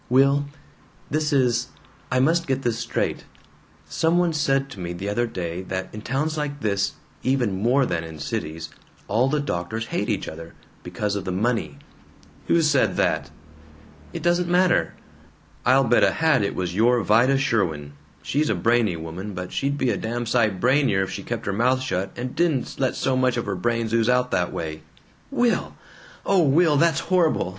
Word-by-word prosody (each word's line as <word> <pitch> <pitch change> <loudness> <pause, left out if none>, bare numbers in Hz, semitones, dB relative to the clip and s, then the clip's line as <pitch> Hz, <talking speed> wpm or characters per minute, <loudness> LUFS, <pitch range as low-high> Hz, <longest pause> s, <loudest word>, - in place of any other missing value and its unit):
"Will, 140 +3 +4 0.7
this 155 +1 0
is 125 -3 +2 0.4
I 125 - +2
must 165 +5 +2
get 135 0 -1
this 115 -1 -1
straight. 120 - -2 0.6
Some 165 +1 +1
one 175 -2 +2
said 135 -2 +1
to 105 - -10
me 85 -1 -4
the 95 +3 -5
other 120 +4 0
day 90 -4 -4
that 95 0 -5
in 105 - -7
towns 150 +7 -2
like 145 -1 -4
this, 100 -2 0 0.3
even 120 -8 0
more 130 +4 +3
than 85 -5 -2
in 80 -1 -9
cities, 80 +2 -4 0.4
all 120 +6 +2
the 150 +1 +1
doctors 110 -3 -3
hate - - -1
each - - -1
other, 80 +1 -9 0.3
because 105 -1 -3
of 100 - -3
the 95 - -3
money 115 +6 -1 0.3
" - - -27
"Who 170 -1 +3
said 145 -3 +2
that?" 80 0 0 0.8
"It - - -6
doesn't 175 0 +2
matter." 180 0 +2 0.7
"I'll 130 +2 +5
bet 120 -1 +3
a - - +4
hat 160 -6 +2
it 100 - -1
was 90 -2 -2
your 115 +3 +3
Vida 120 +7 +4
Sherwin. 85 - -1 0.3
She's 150 +2 0
a - - +1
brainy 115 -5 +2
woman, 85 +5 -7
but 90 0 -6
she'd 140 +1 -1
be 130 -3 +1
a 100 - -1
damn 120 +2 -3
sight 110 -5 +1
brainier 125 -5 +3
if 95 - -5
she - - -5
kept - - -5
her 95 - -1
mouth 125 +5 +2
shut 95 -7 -2
and 125 +1 -5
didn't 160 -7 0
let 130 -2 +1
so 130 - 0
much 130 -1 +1
of 120 - -2
her 100 -2 -2
brains 115 +4 -1
ooze 115 0 +2
out 125 0 +2
that 90 -1 0
way." 80 -1 -5 0.5
"Will! 240 -1 0 0.5
O 195 -2 +3
Will! 155 +1 +4
That's 165 0 +3
horrible! 170 - +1
120 Hz, 185 wpm, -23 LUFS, 95-140 Hz, 0.8 s, I'll